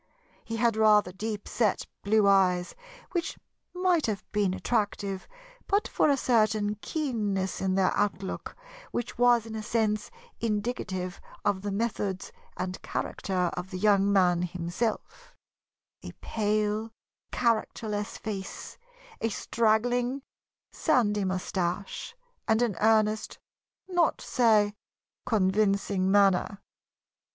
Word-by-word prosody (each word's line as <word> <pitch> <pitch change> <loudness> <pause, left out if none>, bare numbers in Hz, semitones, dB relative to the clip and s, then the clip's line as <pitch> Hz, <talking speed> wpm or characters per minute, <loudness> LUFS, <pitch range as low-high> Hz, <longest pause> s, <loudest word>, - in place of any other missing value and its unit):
He 225 - -5
had 230 -1 +2
rather 210 -4 +5
deep 210 +2 -5
set 215 -5 +1 0.2
blue 210 +1 +3
eyes, 180 -2 +3 0.4
which 340 -2 -2 0.3
might 360 -5 +2
have 210 -3 -3
been 205 -3 +1
attractive 205 -4 -1 0.4
but 405 +1 +2
for - - +2
a 280 - +3
certain 215 -4 +2
keenness 210 -11 -2
in 190 -1 +1
their 190 -1 +2
outlook, 195 -2 -2 0.3
which 240 0 -4
was 240 -2 +5
in 225 - -8
a 220 - -3
sense 215 -1 0 0.3
indicative 205 -5 -2 0.2
of 190 -2 +1
the 205 0 -3
methods 200 -3 -2 0.3
and 185 0 -4
character 180 -2 -2
of 180 +1 -5
the 185 - -5
young 200 0 +3
man 180 -3 +4
himself; 180 +5 -3 0.7
a - - -8
pale, 215 0 -1 0.4
characterless 215 -3 -1
face, 200 -3 -6 0.4
a 225 - +1
straggling, 245 +4 +1 0.5
sandy 210 - +2
moustache, 185 - -3 0.3
and 220 +2 +3
an 225 -6 0
earnest, 215 0 +2 0.5
not 350 -3 +2
to - - -11
say 215 -4 +3 0.5
convincing, 200 -2 +2
manner. 200 0 +3
210 Hz, 115 wpm, -28 LUFS, 195-225 Hz, 0.7 s, rather